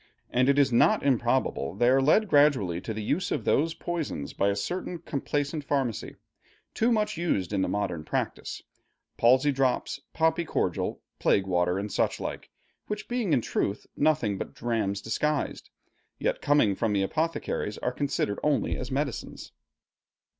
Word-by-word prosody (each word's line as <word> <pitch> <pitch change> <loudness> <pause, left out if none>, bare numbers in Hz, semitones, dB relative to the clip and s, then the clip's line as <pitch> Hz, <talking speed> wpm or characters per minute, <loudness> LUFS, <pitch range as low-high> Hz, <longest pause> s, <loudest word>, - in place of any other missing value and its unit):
And 130 +2 +3
it 140 - +4
is 140 -3 +4
not 115 - +4
improbable 120 - +1
they 120 +4 +2
are 135 +2 +5
led 185 +11 +4
gradually 135 - +3
to 110 - -5
the 110 0 -4
use 180 - 0
of - - -2
those 160 +3 +2
poisons 160 - -4
by 100 - +1
a 100 - 0
certain 175 - -3
complaisant 145 -1 -2
pharmacy, 135 -7 -2 0.6
too 230 +2 +2
much 215 -6 +1
used 105 - -1
in 100 - +1
the - - +1
modern 90 -6 -2
practice, - - -3 0.5
palsy 130 +5 +4
drops, 135 +1 0
poppy 160 +1 +2
cordial, 95 - -2 0.2
plague 95 - +3
water, 90 -1 +1
and 100 +1 -3
such - - 0
like, - - -5 0.4
which 210 0 -4
being 240 -7 -1
in 135 -5 +4
truth 100 -2 -2
nothing 145 -10 +1
but - - -6
drams 110 -4 -1
disguised, 150 +7 -1 0.5
yet - - -1
coming 145 -8 +3
from 110 +1 0
the 100 -1 +2
apothecaries, 155 -4 -2
are 125 - -1
considered 135 -7 -1
only 150 -2 +1
as 130 - -5
medicines. 135 -2 -4
130 Hz, 160 wpm, -27 LUFS, 105-150 Hz, 0.6 s, are